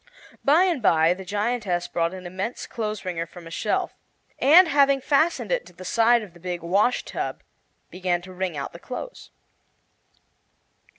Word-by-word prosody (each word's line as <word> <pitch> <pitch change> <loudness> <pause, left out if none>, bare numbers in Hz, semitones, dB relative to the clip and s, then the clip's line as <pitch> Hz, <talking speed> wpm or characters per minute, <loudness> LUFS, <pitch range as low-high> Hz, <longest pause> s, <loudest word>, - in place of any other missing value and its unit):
By 305 +6 +5
and 345 -8 0
by 165 -4 +4
the 190 +1 -9
giantess 205 -2 -1
brought 170 0 -1
an 185 -1 -10
immense 190 +7 -4
clothes 215 -4 -4
wringer 170 -2 -3
from 175 0 -13
a 165 - -10
shelf, - - -1 0.5
and 335 +6 +7
having 280 -2 +4
fastened 310 - +1
it - - +1
to - - -16
the 185 +2 -11
side 230 +2 +3
of 195 -5 -12
the 175 - -16
big 175 -1 -5
wash 200 +8 +1
tub - - -5 0.5
began 180 -1 -1
to 185 0 -11
wring 180 -3 -3
out 140 - -5
the 170 - -10
clothes. 255 - -8
190 Hz, 170 wpm, -24 LUFS, 175-250 Hz, 0.5 s, and